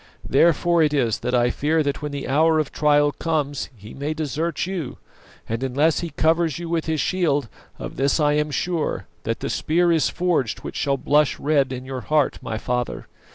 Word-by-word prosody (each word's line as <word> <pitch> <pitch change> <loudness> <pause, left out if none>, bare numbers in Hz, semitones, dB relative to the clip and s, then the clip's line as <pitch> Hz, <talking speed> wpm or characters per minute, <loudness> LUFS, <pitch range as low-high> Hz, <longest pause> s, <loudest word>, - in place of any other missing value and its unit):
Therefore 170 +1 +3
it 150 -1 +2
is 120 -6 +1
that 125 +1 -1
I 120 0 +3
fear 155 +2 +1
that 140 +1 -2
when 150 -1 -4
the 140 -1 -5
hour 160 +3 +3
of 155 -2 0
trial 145 -1 +3
comes 145 -3 -2
He 105 +1 -12
may 145 +3 -3
desert 155 +2 -2
you; 175 -8 -4 0.5
and 115 +2 -3
unless 140 +4 +2
He 170 - -4
covers 160 0 +1
you 170 0 -6
with 165 -1 -1
His 160 -1 0
shield, 145 -9 +1 0.3
of - - -7
this 140 +3 +2
I 150 -1 +3
am 150 0 +1
sure, 165 +1 -2 0.2
that - - -2
the - - -2
spear 170 +2 +2
is 160 -3 +2
forged 170 -10 0
which - - -7
shall 140 -1 0
blush 150 +2 +2
red 140 -3 +2
in 130 0 -5
your 130 -1 -5
heart, 145 +6 +1
my 110 -1 -4
father. 125 +1 -3
150 Hz, 200 wpm, -23 LUFS, 135-160 Hz, 0.5 s, Therefore